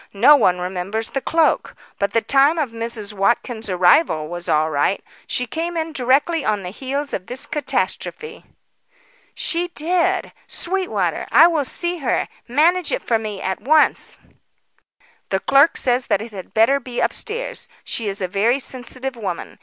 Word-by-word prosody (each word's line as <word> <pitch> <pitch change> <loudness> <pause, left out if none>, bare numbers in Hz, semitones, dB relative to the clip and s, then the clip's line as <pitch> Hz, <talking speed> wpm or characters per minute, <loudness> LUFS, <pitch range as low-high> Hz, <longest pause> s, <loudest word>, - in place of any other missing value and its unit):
"No 280 +8 +8
one 180 -10 +3
remembers 185 +5 -4
the 270 - -2
cloak. 325 +4 +1 0.2
But 200 - +1
the 230 - +1
time 280 +4 +4
of 290 -7 -1
Mrs. 230 -2 -4
Watkins' 220 +2 -1
arrival 180 - +3
was 175 0 -6
all 155 +1 +2
right. 145 +6 0 0.2
She 250 - -1
came 335 +7 -4
in 320 0 -3
directly 280 +4 +1
on 210 -4 -1
the 180 - -6
heels 275 +5 -4
of 185 - -4
this 250 +2 -1
catastrophe." 300 - -3 0.9
"She 345 +1 -1
did! 345 +1 0
Sweetwater, 220 - 0
I 295 +8 +8
will 325 -5 +2
see 345 +5 -1
her. 270 - 0 0.2
Manage 330 +8 +2
it - - -2
for 225 -2 +1
me 210 -3 -6
at 190 0 -3
once." 305 +3 +2 1.1
"The 190 - 0
clerk 275 +9 +4
says 250 0 +1
that - - +2
it 225 +2 -8
had 190 -3 -9
better 230 +6 +4
be 245 -2 -6
upstairs. 470 +2 -2
She 225 - -3
is 200 0 -3
a 185 - 0
very 210 +7 +1
sensitive 260 0 -5
woman. 195 -7 -6
245 Hz, 160 wpm, -20 LUFS, 200-305 Hz, 1.1 s, No